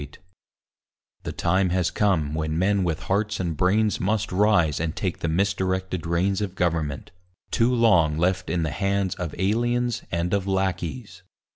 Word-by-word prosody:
REFORM 70 +5 -11 1.0
The - - -5
time 90 +2 +1
has 90 0 0
come 85 -8 +1
when 80 0 -2
men 100 +2 +2
with 85 -3 -2
hearts 105 +2 -1
and 85 -3 -2
brains 105 +6 +2
Must 105 +2 -1
rise 90 -6 +3
and 80 +1 -2
take 95 -3 -3
the - - -2
misdirected 95 0 -1
reins 95 +4 +1
Of 95 -3 -3
government; 80 -6 -2 0.4
too 115 +2 +2
long 90 -11 +3
left 90 +2 0
in 85 -2 0
the 80 - -2
hands 100 0 0
Of 90 -6 -5
aliens 120 +4 0
and 85 +2 -1
of 100 -1 0
lackeys. 95 +1 -2
95 Hz, 160 wpm, -24 LUFS, 85-100 Hz, 1.0 s, rise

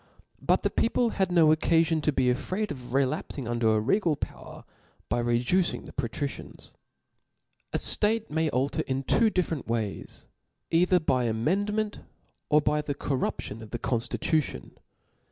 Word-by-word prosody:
But - - +2
the - - +1
people 230 0 +1
hacj 190 -2 0
no 170 -3 +5
Qccafion 165 0 +2
tp 150 -1 0
be 130 -1 +3
afraid 190 +12 -2
of 125 -3 -8
relapfing 135 -1 -1
under 115 -2 +2
a - - +3
regal 155 - +1
pbwer, - - -8 0.5
by 120 - +1
reducing 120 +10 +1
the - - -11
Patricians. - - -5 1.0
A - - 0
ftate 220 +1 +3
may 160 0 +1
alter 135 +1 0
two 135 - +1
different 170 - -2
ways, 110 -3 -4 0.5
either 180 +2 +4
hj 160 - -16 0.2
the - - +1
amendment 205 - -1 0.5
or 150 0 +5
by 150 +1 +1
the 145 -1 -4
corruption 130 -6 -3
of 110 - -10
the 120 - -4
conftit 120 -1 -2
tunon. 145 - -1
150 Hz, 150 wpm, -27 LUFS, 120-180 Hz, 1.0 s, no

